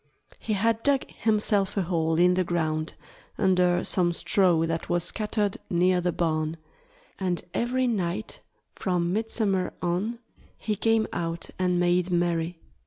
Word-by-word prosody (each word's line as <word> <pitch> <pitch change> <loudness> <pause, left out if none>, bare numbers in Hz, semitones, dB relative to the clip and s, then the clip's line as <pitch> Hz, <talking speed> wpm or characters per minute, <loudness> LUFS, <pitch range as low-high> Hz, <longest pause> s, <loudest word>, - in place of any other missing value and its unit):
He 215 - -2
had 225 +2 +1
dug 275 +1 +2
himself 210 -3 +1
a 195 - +2
hole 165 -2 0
in 180 +1 +5
the 185 0 +1
ground, 155 -2 -2 0.4
under 180 -2 +3
some 175 -3 +2
straw 175 -2 +3
that 165 0 -3
was 175 -1 +1
scattered 210 0 -1
near 180 +1 +2
the 175 0 0
barn; 155 -1 -1 0.6
and 180 -3 -1
every 255 +2 0
night, 205 -3 -2 0.3
from 175 -2 -1
midsummer 210 -3 0
on, 185 +7 -1 0.4
he 215 - -2
came 225 +1 +2
out 165 0 -4
and 180 -1 +1
made 175 +1 +2
merry. 170 -1 0
180 Hz, 140 wpm, -26 LUFS, 170-210 Hz, 0.6 s, in